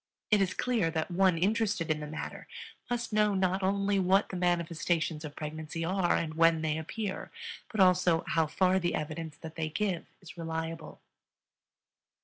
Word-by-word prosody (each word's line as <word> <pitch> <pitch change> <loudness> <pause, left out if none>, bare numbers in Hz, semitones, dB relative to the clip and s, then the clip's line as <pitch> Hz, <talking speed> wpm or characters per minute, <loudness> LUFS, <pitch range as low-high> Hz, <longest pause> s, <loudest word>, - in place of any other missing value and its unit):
It 210 -2 +5
is 185 -2 0
clear 230 -9 +1
that 160 +2 -2
one 185 -1 +3
interested 200 -2 +1
in 155 - 0
the 150 - -5
matter 155 - -6 0.4
must 240 -2 -2
know 210 -1 +3
not 190 0 +1
only 200 +1 +1
what 190 +2 +3
the - - -5
manifestations 170 -2 0
of 150 -2 -7
pregnancy 155 +2 -5
are 180 0 +2
and 160 -2 -1
when 165 0 +4
they 155 0 0
appear, 195 +5 -4 0.4
but 215 - -4
also 180 -3 +4
how 160 -1 +2
far 185 +4 +2
the 175 -1 0
evidence 155 0 -5
that 160 -1 -9
they 160 -1 -3
give 185 +1 -2
is 180 -1 -13
reliable. 165 0 -5
175 Hz, 165 wpm, -30 LUFS, 160-195 Hz, 0.4 s, It